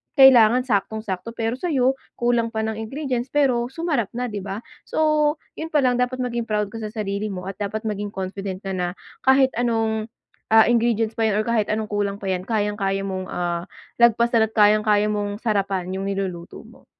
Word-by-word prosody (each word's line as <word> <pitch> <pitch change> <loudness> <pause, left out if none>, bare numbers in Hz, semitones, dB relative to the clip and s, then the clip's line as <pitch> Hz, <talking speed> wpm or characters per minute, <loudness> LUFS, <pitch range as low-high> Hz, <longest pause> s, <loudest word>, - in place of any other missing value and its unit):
kailangan 250 -3 +7
saktong-sakto 220 -1 -2
pero 230 +3 -2
sayo 270 -7 +2 0.2
kulang 240 -1 0
pa 220 - 0
ng 220 0 -3
ingredients 255 +1 -3
pero 260 -4 +1
sumarap 280 - -1
na, 245 -1 -2
'di 205 - -3
ba? 200 +3 -6 0.2
So 305 -1 +2 0.2
yun 320 - -3
pa 290 -3 +3
lang 250 -1 +2
dapat 250 +1 0
maging 235 -1 -3
proud 210 -2 -1
ka 225 - -7
sa 215 - -4
sarili 210 -1 -3
mo 185 -3 -5
at 195 - -20
dapat 210 +2 -3
maging 205 -1 -4
confident 190 0 -5
ka 195 - -4
na 180 0 -2 0.3
kahit 265 0 +5
anong 225 -2 0 0.5
ah, 225 0 +7
ingredients 230 -2 +1
pa 225 - +2
yan 210 -1 +1
or - - -5
kahit 230 -3 +2
anong 215 0 -2
kulang 205 -1 -1
pa 195 - -3
yan 185 -1 -2
kayang-kaya 205 -3 0
mong 190 -1 -3
ah, 175 -1 -2 0.3
lagpasan 235 -1 +4
at 220 - -20
kayang-kaya 210 0 +4
mong 205 -1 -2
sarapan 195 -5 -1
yung 195 - -3
niluluto 190 -3 -4
mo. - - -18
220 Hz, 185 wpm, -23 LUFS, 200-240 Hz, 0.5 s, kailangan